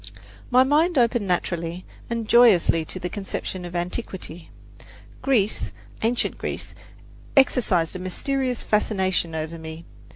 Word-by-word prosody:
My 255 +1 +6
mind 305 +5 +2
opened 235 -4 +2
naturally 175 -1 -2 0.2
and 230 -2 -2
joyously 210 -9 +5
to 185 - -6
a - - 0
conception 190 -1 -5
of 175 0 -8
antiquity. 175 -2 -5 0.7
Greece, 220 -7 +1 0.3
ancient 235 +2 0
Greece, - - -5 0.6
exercised 200 -11 +3
a - - -4
mysterious 255 +7 -2
fascination 190 -5 0
over 160 +1 -4
me. 160 +1 -8
190 Hz, 120 wpm, -24 LUFS, 175-240 Hz, 0.7 s, My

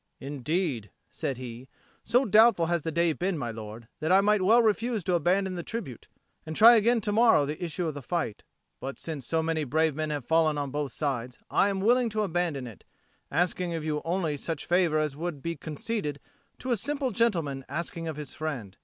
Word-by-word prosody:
"Indeed," 140 - -2 0.2
said 135 - -3
he, 125 0 -8 0.3
"so 250 +3 +3
doubtful 215 -4 +5
has 170 0 0
the 160 - -3
day 170 0 +2
been, 180 +2 -1
my 120 -5 -3
lord, 110 +1 -9
that 160 +2 -1
I 190 - +7
might 210 0 +3
well 225 +6 +5
refuse 225 0 +1
to 180 - 0
abandon 185 +3 +2
the 175 - -4
tribute, 175 - -6 0.4
and 160 0 -6
try 230 +6 +9
again 230 +1 +3
to 210 0 -1
morrow 225 -8 +5
the 150 +5 -5
issue 175 +1 -2
of 160 - -2
the 145 - -7
fight. 165 - -3 0.4
But, 135 +1 -6
since 150 -7 -6
so 160 -1 +1
many 160 -1 0
brave 155 +3 +1
men 155 +2 -3
have 145 -4 -3
fallen 160 -1 +3
on 140 -2 -3
both 145 -1 -2
sides, 125 -4 -3
I 200 - +4
am 195 -1 -2
willing 240 +3 +3
to 215 0 -1
abandon 170 -7 -1
it, 115 -4 -11 0.5
asking 175 +2 0
of 160 - -4
you 150 -1 -1
only 165 -3 -1
such 160 +1 -4
favour 175 -3 +2
as 150 -2 0
would 160 -1 -4
be 170 0 -2
conceded 160 - -4 0.4
to 255 - -4
a 235 - +2
simple 275 +3 -2
gentleman 165 -12 0
asking 165 +3 -4
of 160 - -3
his 150 -1 -7
friend. 135 -12 -5
165 Hz, 205 wpm, -28 LUFS, 145-195 Hz, 0.5 s, try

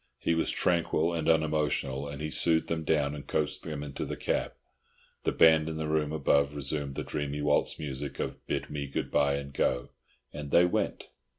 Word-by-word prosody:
He 85 - 0
was 80 - +2
tranquil 85 -1 +2
and 80 -1 0
unemotional, 75 -3 +1
and 70 +1 -6
he 75 - -3
soothed 80 0 +2
them 80 -1 -1
down 75 -2 +1
and 75 -1 -8
coaxed 75 -1 -1
them 75 -3 -5
into 70 -2 -5
the - - -4
cab. - - -1 0.7
The - - +2
band 80 -1 +5
in 80 - -4
the 80 -1 -2
room 75 -1 0
above 70 -1 +2
resumed 70 -1 -3
the - - -3
dreamy 75 0 -3
waltz 75 0 +2
music 70 -2 -5
of - - -4
"Bid - - -3
me 70 -1 -3
Good 70 - -3
bye 70 -1 +3
and 70 0 -6
go!" 60 -2 0 0.4
and 75 -1 -6
they 85 +4 +6
went. 90 - -1
75 Hz, 195 wpm, -29 LUFS, 70-80 Hz, 0.7 s, they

